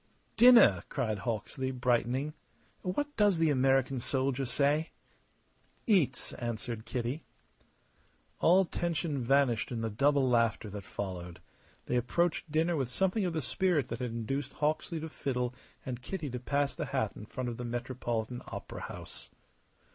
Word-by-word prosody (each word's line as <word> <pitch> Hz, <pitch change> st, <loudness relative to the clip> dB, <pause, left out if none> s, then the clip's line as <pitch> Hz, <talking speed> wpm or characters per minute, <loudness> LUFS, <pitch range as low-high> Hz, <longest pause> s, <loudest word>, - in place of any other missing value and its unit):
"Dinner!" 230 Hz, -, +7 dB
cried 110 Hz, -7 st, -1 dB
Hawksley, 120 Hz, +4 st, -3 dB
brightening. 125 Hz, +3 st, 0 dB, 0.5 s
"What 290 Hz, +11 st, -2 dB
does 205 Hz, -4 st, +4 dB
the 160 Hz, -2 st, +3 dB
American 135 Hz, -1 st, +2 dB
soldier 135 Hz, +2 st, 0 dB
say?" 145 Hz, +5 st, +1 dB, 1.0 s
"Eats!" 165 Hz, -, +2 dB
answered 115 Hz, -1 st, -4 dB
Kitty. 125 Hz, +5 st, -2 dB, 1.2 s
All 185 Hz, +3 st, +5 dB
tension 165 Hz, -4 st, -2 dB
vanished 130 Hz, -3 st, +2 dB
in 115 Hz, -2 st, -2 dB
the 115 Hz, -1 st, -2 dB
double 140 Hz, +4 st, +3 dB
laughter 115 Hz, -3 st, +2 dB
that 100 Hz, -2 st, -7 dB
followed. 90 Hz, -3 st, -5 dB, 0.5 s
They 125 Hz, -, 0 dB
approached 160 Hz, +6 st, 0 dB
dinner 165 Hz, +3 st, +2 dB
with 135 Hz, -5 st, -1 dB
something 190 Hz, -, +1 dB
of 175 Hz, -, -1 dB
the 160 Hz, -3 st, -1 dB
spirit 150 Hz, 0 st, +1 dB
that -, -, -4 dB
had 125 Hz, -1 st, -2 dB
induced 125 Hz, +5 st, -3 dB
Hawksley 155 Hz, +2 st, -1 dB
to 160 Hz, -, -4 dB
fiddle 125 Hz, -4 st, -2 dB, 0.3 s
and 125 Hz, -1 st, -4 dB
Kitty 155 Hz, 0 st, -4 dB
to 125 Hz, -, -3 dB
pass 140 Hz, +3 st, 0 dB
the -, -, -3 dB
hat 130 Hz, -6 st, 0 dB
in 105 Hz, -, -9 dB
front 130 Hz, -1 st, -3 dB
of 115 Hz, -, -5 dB
the 125 Hz, -, -5 dB
Metropolitan 120 Hz, -1 st, -3 dB
Opera -, -, -7 dB
House. -, -, -8 dB
130 Hz, 145 wpm, -31 LUFS, 120-155 Hz, 1.2 s, Dinner